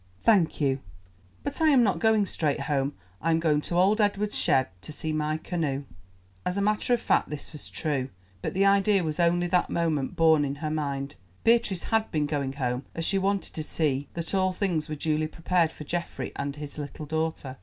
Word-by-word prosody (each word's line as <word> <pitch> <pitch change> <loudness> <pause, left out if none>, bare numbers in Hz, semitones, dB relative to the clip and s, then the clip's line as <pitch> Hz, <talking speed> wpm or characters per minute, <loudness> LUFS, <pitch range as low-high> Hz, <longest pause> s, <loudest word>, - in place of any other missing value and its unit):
"Thank 195 -8 +3
you, 135 -2 +1 0.6
but 285 +3 -3
I 320 - +5
am 265 -5 +6
not 200 -4 +1
going 220 -2 +3
straight 150 -6 0
home; 140 -1 -1 0.3
I 165 - 0
am 165 0 +3
going 155 -2 +2
to 170 - -4
old 200 +5 +4
Edward's 205 0 0
shed 130 -4 +3
to - - -7
see 155 +1 -2
my 155 0 0
canoe." 155 -5 -2 0.6
As 180 +2 -1
a - - +1
matter 210 +4 +2
of - - -5
fact - - +1
this 150 +1 -6
was 150 - -6
true, 140 -4 -2 0.3
but - - -4
the 195 +1 +3
idea 195 -1 +4
was 155 0 -3
only 175 +1 +3
that 175 0 +1
moment 155 -5 0
born 160 -2 +5
in 140 0 -2
her 150 +1 -4
mind. 140 -2 -3 0.3
Beatrice 225 -6 +3
had 225 -1 +1
been 150 -2 0
going 145 -2 -2
home, 125 -2 -2
as 165 - 0
she 195 - +3
wanted 195 +1 -1
to 155 - -4
see 145 -3 0
that 170 +2 -4
all 185 -1 +2
things 170 -5 -1
were 155 - -2
duly 155 +1 0
prepared 165 0 +1
for 150 - -9
Geoffrey 170 +3 -4
and 140 0 -3
his 150 0 -7
little 145 +1 -6
daughter. 160 -4 -3
160 Hz, 210 wpm, -27 LUFS, 145-190 Hz, 0.6 s, am